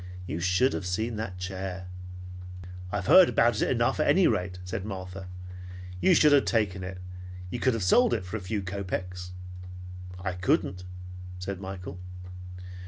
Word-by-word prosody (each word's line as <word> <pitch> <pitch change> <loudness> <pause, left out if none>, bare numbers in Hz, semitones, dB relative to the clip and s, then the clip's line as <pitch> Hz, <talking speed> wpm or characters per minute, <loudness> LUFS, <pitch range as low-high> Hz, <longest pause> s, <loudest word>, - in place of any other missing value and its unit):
You 85 - -3
should 95 +9 +3
have 90 - -2
seen 110 +6 0
that 95 -4 -3
chair." 95 0 -4 1.1
"I've 100 -2 -1
heard 185 - +9
about 115 -1 +4
it - - +3
enough 120 +2 +2
at 155 - +3
any 190 -1 +6
rate," 90 -4 +1
said 90 +1 -3
Martha. 95 -2 -5 0.7
"You 185 - +6
should 150 -2 +7
have 145 -1 +6
taken 100 -5 +1
it. 95 0 -5 0.5
You - - -2
could 130 -3 +3
have 110 - -1
sold 120 +8 +6
it 95 -5 -3
for 90 - -5
a - - -1
few 100 +2 -2
kopeks. 90 -1 -3 0.9
"I 90 0 -2
couldn't," 90 0 +1 0.5
said 95 +1 -4
Michael. 95 -2 -6
95 Hz, 160 wpm, -29 LUFS, 90-110 Hz, 1.1 s, heard